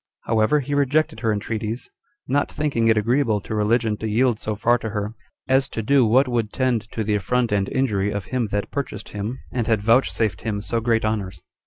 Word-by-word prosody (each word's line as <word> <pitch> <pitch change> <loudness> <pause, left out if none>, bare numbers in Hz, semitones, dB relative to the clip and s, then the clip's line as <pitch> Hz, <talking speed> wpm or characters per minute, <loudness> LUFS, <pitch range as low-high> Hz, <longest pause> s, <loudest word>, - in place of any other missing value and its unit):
However, 115 +6 +2
he 140 +2 -4
rejected 145 -2 +1
her 115 -2 +1
entreaties, 110 +2 -3 0.4
not 140 +2 +1
thinking 140 -7 0
it 110 -1 +4
agreeable 115 0 +2
to 110 - -6
religion 110 +1 +1
to 110 - -4
yield 115 +1 +2
so 110 - -3
far 120 +3 +2
to 110 - -4
her, 105 0 -3 0.3
as 130 0 +3
to 115 - -4
do 135 0 +4
what 130 +5 +4
would 115 -4 -1
tend 120 -5 0
to 110 - -2
the 105 0 0
affront 120 +4 0
and 100 -1 +1
injury 105 -7 0
of 100 -2 -3
him 125 -3 -1
that 100 0 -3
purchased 130 -7 -4
him, 105 +5 -4
and 120 -3 -2
had 110 -3 +1
vouchsafed 115 -4 +2
him 105 -3 -2
so 115 +3 -2
great 115 -1 +1
honors. 100 -6 -3
115 Hz, 205 wpm, -22 LUFS, 105-125 Hz, 0.4 s, it